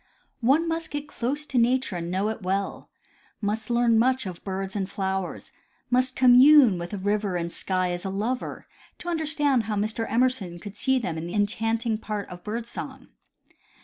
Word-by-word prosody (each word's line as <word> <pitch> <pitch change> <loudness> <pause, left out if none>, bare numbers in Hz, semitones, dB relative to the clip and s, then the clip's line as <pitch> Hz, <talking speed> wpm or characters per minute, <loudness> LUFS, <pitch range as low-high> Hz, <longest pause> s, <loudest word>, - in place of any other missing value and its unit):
One 280 +8 +3
must 330 0 -2
get 290 0 -5
close 290 +2 -3
to 265 -4 0
nature 245 -3 +2
and 170 0 -4
know 190 +4 0
it 220 0 -5
well; 195 +1 -2 0.5
must 215 +1 -2
learn 235 -1 +3
much 255 +1 +2
of 180 -3 -7
birds 195 0 -4
and 195 -2 -2
flowers; 190 -2 -3 0.4
must 255 +1 +2
commune 255 -4 +7
Avith 185 +3 -5
river 205 -2 0
and 170 -1 -2
sky 185 0 -1
as 175 0 -4
a 195 - -3
lover, 220 +7 -3 0.3
to 350 - -6
understand 295 -7 +1
how 215 0 -2
Mr. 215 +2 -2
Emerson 230 -7 +1
could 205 +2 -9
see 265 +5 +2
in 255 - +1
them 160 -4 -3
the 175 - -5
enchanting 225 +2 0
part 210 -2 -4
of 175 0 -10
bird 225 +2 -4
song. - - -8
220 Hz, 180 wpm, -26 LUFS, 195-255 Hz, 0.5 s, commune